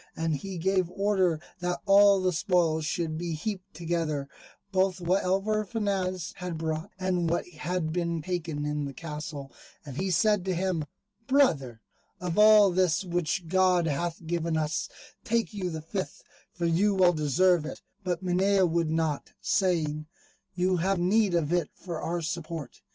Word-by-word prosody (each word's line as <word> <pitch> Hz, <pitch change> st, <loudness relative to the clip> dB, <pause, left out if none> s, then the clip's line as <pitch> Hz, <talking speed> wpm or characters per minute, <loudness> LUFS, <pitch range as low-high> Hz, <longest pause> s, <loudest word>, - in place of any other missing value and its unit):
And 160 Hz, -1 st, 0 dB
he 190 Hz, +5 st, -6 dB
gave 185 Hz, 0 st, +1 dB
order 190 Hz, -4 st, +1 dB, 0.2 s
that 180 Hz, 0 st, -2 dB
all 200 Hz, 0 st, +6 dB
the 185 Hz, -1 st, +2 dB
spoils 160 Hz, -2 st, +1 dB
should 160 Hz, 0 st, -2 dB
be 170 Hz, -1 st, -3 dB
heaped 185 Hz, +4 st, -5 dB
together, 165 Hz, -4 st, -2 dB, 0.4 s
both 190 Hz, -1 st, +1 dB
what 180 Hz, +3 st, +1 dB
Alvar 195 Hz, +4 st, +1 dB
Fanez 190 Hz, -5 st, -2 dB
had 180 Hz, -3 st, -4 dB
brought, 160 Hz, +3 st, -3 dB
and 180 Hz, -3 st, 0 dB
what 170 Hz, -, 0 dB
had 160 Hz, 0 st, -3 dB
been 170 Hz, -2 st, -1 dB
taken 165 Hz, -4 st, -3 dB
in 150 Hz, 0 st, -2 dB
the 140 Hz, -1 st, -7 dB
castle; 150 Hz, -2 st, -6 dB, 0.3 s
and 140 Hz, -2 st, -8 dB
he 190 Hz, +1 st, -1 dB
said 210 Hz, +2 st, +3 dB
to 190 Hz, -1 st, 0 dB
him, 175 Hz, -3 st, -1 dB, 0.4 s
"Brother, 145 Hz, -, +2 dB, 0.4 s
of 180 Hz, +1 st, -2 dB
all 210 Hz, -2 st, +7 dB
this 180 Hz, 0 st, +2 dB
which 175 Hz, -1 st, -1 dB
God 185 Hz, -1 st, +3 dB
hath 165 Hz, +2 st, -2 dB
given 165 Hz, -1 st, -1 dB
us, 155 Hz, 0 st, -1 dB, 0.3 s
take 230 Hz, -5 st, 0 dB
you 190 Hz, -3 st, -3 dB
the 160 Hz, -2 st, -6 dB
fifth, 175 Hz, -2 st, -5 dB, 0.3 s
for 175 Hz, -, -3 dB
you 190 Hz, +5 st, +2 dB
well 180 Hz, -2 st, +5 dB
deserve 165 Hz, +3 st, +3 dB
it"; 155 Hz, -, -7 dB, 0.2 s
but 180 Hz, -1 st, -2 dB
Minaya 190 Hz, +2 st, +3 dB
would 165 Hz, -1 st, 0 dB
not, 160 Hz, -2 st, -1 dB
saying, 155 Hz, -5 st, 0 dB, 0.5 s
"You 185 Hz, +1 st, +1 dB
have 190 Hz, +3 st, +1 dB
need 190 Hz, +2 st, +2 dB
of 165 Hz, -1 st, +1 dB
it 175 Hz, -1 st, +1 dB
for 170 Hz, -4 st, -6 dB
our 170 Hz, 0 st, -2 dB
support." 160 Hz, -3 st, -5 dB
175 Hz, 160 wpm, -28 LUFS, 160-190 Hz, 0.5 s, all